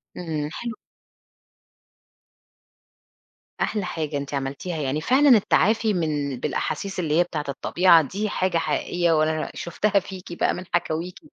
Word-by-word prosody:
امم، 155 -4 -3
حلو 235 -1 -5 2.9
أحلى 210 -4 0
حاجة 155 -4 -3
أنتِ 140 0 -5
عملتيها، 140 +5 -3
يعني 145 0 -1
فعلًا 265 - +4
التعافي 215 +2 +2
من 145 -6 -1
بالأحاسيس 195 +8 -3
اللي 160 -1 +1
هي 175 - +6
بتاعة 155 -4 -5
الطبيعة 170 +4 +4
دي 200 +9 -3
حاجة 185 -3 0
حقيقيّة 170 +1 0
وأنا 155 0 +1
شفتها 200 +3 +1
فيكِ 185 -1 -9
بقى - - +2
من 180 - -6
حكاويكِ، 175 +1 -1
170 Hz, 125 wpm, -24 LUFS, 150-190 Hz, 2.9 s, هي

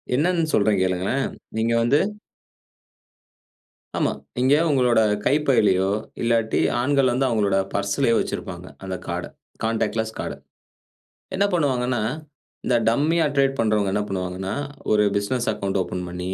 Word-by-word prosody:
என்னன்னு 165 +2 +1
சொல்றேன் 100 -1 +3
கேளுங்களேன்! 95 +9 0 0.3
நீங்க 115 +1 +1
வந்து 135 +6 +3 2.0
ஆமா. - - +1 0.3
இங்க 130 +2 +4 0.2
உங்களோட 125 -5 +3 0.3
கைப் 150 +2 +2
பைலயோ! 95 -7 +3 0.3
இல்லாட்டி 115 -1 +1 0.2
ஆண்கள் 135 -1 +2
வந்து 130 +3 +1
அவுங்களோட 105 -5 +1 0.2
பர்ஸ்லயோ 100 +5 +1
வச்சிருப்பாங்க. - - -4 0.2
அந்த 95 -1 -4
கார்ட் - - -3
அ - - -23 0.3
கான்டாக்ட்லெஸ் 110 0 -1
கார்ட. - - -4 1.0
என்ன 200 +1 +2
பண்ணுவாங்கன்னா, 130 -7 +1 0.6
இந்த 125 - +2
டம்மி 150 +8 +2
ஆ - - +3
டிரேட் 135 0 +2
பண்றவங்க 105 -3 +2
என்ன 105 0 +1
பண்ணுவாங்கன்னா, 95 +1 -3 0.4
ஒரு 105 -1 +4
பிசினஸ் 120 +4 -1
அக்கவுண்ட் 100 -2 -2
ஓப்பன் 90 0 -5
பண்ணி, 90 +1 -4
115 Hz, 130 wpm, -23 LUFS, 100-135 Hz, 2.0 s, இங்க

